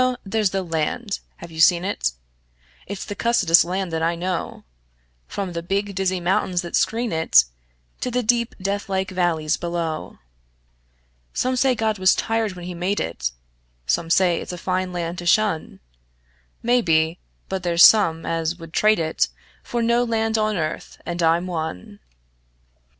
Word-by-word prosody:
There's 210 0 +1
the 195 0 -2
land. 170 +6 -2 0.2
(Have 170 - -10
you 160 - -9
seen 175 +2 +5
it?) 65 - -1 0.7
It's 200 0 -5
the - - -5
cussedest 200 -7 +4
land 185 0 -3
that 160 - -1
I 165 +1 +1
know, 180 +1 -4 0.6
From 190 -3 -4
the 170 - -3
big, 200 +3 -2
dizzy 190 -1 0
mountains 180 0 0
that 170 - -4
screen 235 +1 +1
it 160 - +5 0.6
To - - -2
the 250 0 -1
deep, 235 +1 +1
deathlike 195 -1 -2
valleys 170 -4 0
below. 170 -2 -4 1.2
Some 255 0 +1
say 255 0 +3
God 220 -3 -1
was 185 0 +5
tired 225 -2 -1
when 180 -1 -9
He 180 - -5
made 180 +4 -1
it; 65 -7 -2 0.6
Some 165 - 0
say 175 -1 +3
it's - - -6
a 180 - -6
fine 185 +1 -2
land 175 0 -4
to 175 - -5
shun; 170 - +1 0.8
Maybe; 170 -9 +2 0.3
but 190 -1 -3
there's 170 -1 +4
some 165 -7 +6
as 165 0 -1
would 165 -2 -11
trade 215 0 +4
it 160 -1 0 0.3
For 235 -1 -2
no 235 +1 +3
land 225 -1 0
on 215 -2 +1
earth 155 -2 -4
and 175 0 -3
I'm 165 +2 +3
one. 160 - -5
180 Hz, 160 wpm, -22 LUFS, 165-210 Hz, 1.2 s, some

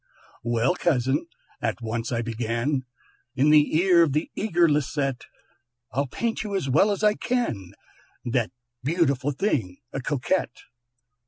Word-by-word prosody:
"Well, 120 +6 +2
cousin," 145 -3 +1 0.3
at 115 +1 -1
once 115 +1 -3
I 115 -1 0
began 115 +4 -1 0.5
In 140 +3 +4
the 150 0 +5
ear 175 0 +5
of 160 -5 +3
the 155 +3 -1
eager 175 -5 +3
Lisette, 140 -3 0 0.7
"I'll 140 +2 0
paint 230 - -2
you 205 -2 -3
as 190 -8 -1
well 155 +10 +4
as 205 +1 -1
I 210 0 +5
can 210 - -2 0.5
That 120 -2 0 0.3
wonderful 145 -3 +1
thing, 130 - -1 0.2
a 135 - -3
Coquette. 145 +2 -1
140 Hz, 140 wpm, -25 LUFS, 120-170 Hz, 0.7 s, the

